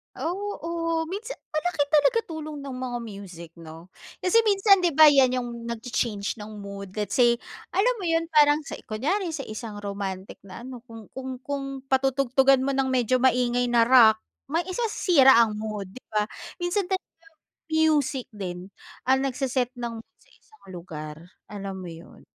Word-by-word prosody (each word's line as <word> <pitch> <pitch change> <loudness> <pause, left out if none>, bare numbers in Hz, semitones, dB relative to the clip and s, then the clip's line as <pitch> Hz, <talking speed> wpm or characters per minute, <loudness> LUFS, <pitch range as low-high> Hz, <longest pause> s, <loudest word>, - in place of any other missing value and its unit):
Oo, 335 -3 -3
minsan 435 +6 -5 0.2
malaki 310 -1 0
talaga 310 +11 +4
tulong 310 -2 -6
ng 275 -2 -6
mga 250 -1 -3
music 195 -6 -9
'no? 165 +2 -12 0.3
Kasi 365 +4 +3
minsan 395 -1 +5
di 350 -3 +1
ba 310 +1 +9
yan 270 -3 +4
yung 240 - -5 0.2
nagcha-change 235 -3 -3
ng 215 0 -9
mood, 200 -1 -8
let's 210 -1 -3
say, 240 -2 +6 0.4
alam 410 +7 +3
mo 385 - -5
yun, 330 0 0
parang 295 -1 +5
sa 295 - -7
i - - -18
kunyari 320 - -1
sa 305 - -3
isang 215 -1 -7
romantic 200 -1 -5
na 190 +3 -10
ano, 250 -1 -10
kung 225 -3 -12
kung 260 -1 -6
kung 280 0 -4 0.3
patutugtugan 270 0 +3
mo 270 - 0
ng 265 -1 +1
medyo 255 0 +2
maingay 245 -1 +2
na 240 -1 +3
rock, 220 -4 +7 0.3
mai 335 - +3
sisira 365 - +4
ang 225 -2 +4
mood, 210 -3 -5
di 255 +7 -13
ba? 210 0 +1 0.3
Minsan 350 +3 0
talaga 365 -3 -5 0.5
music 300 -5 +2
din 185 -2 -6 0.4
ang 265 0 +5
nagse-set 255 -1 -1
ng 235 -1 -4
mood - - -45
sa - - -26
isang 435 -1 -25
lugar, 155 -4 -7 0.3
alam 195 -2 -6
mo 180 - -7
yun? 165 +1 -13
255 Hz, 165 wpm, -25 LUFS, 215-315 Hz, 0.5 s, ba